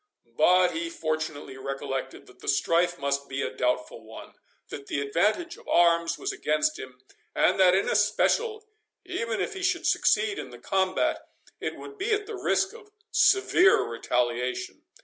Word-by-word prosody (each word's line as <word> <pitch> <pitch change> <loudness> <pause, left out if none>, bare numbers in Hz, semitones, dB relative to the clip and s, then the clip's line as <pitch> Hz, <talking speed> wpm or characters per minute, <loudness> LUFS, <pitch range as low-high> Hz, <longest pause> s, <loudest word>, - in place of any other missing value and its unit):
But 180 0 +5
he 335 0 -3
fortunately 155 - -4
recollected, 135 0 -5
that 125 0 -19
the - - -13
strife 175 +5 +2
must 140 -1 -2
be 135 +1 -2
a - - -3
doubtful 125 -2 -2
one—that 110 +5 -12
the - - -2
advantage 205 - 0
of - - -18
arms 170 -1 +3
was 395 - -3
against 155 - 0
him—and 130 +7 -3
that, 185 -1 +6
in 195 - +1
especial, 430 - +1 0.4
even 230 -12 -3
if - - -2
he 385 - -7
should 385 - 0
succeed 420 -3 +2
in - - -7
the - - -11
combat, 190 -1 0 0.4
it - - -4
would 415 0 -11
be 420 +4 0
at 420 0 0
the 440 - -7
risk 390 0 0
of 455 -3 -14 0.2
severe 390 -1 +4
retaliation. 120 +1 -2
175 Hz, 155 wpm, -27 LUFS, -, 0.4 s, that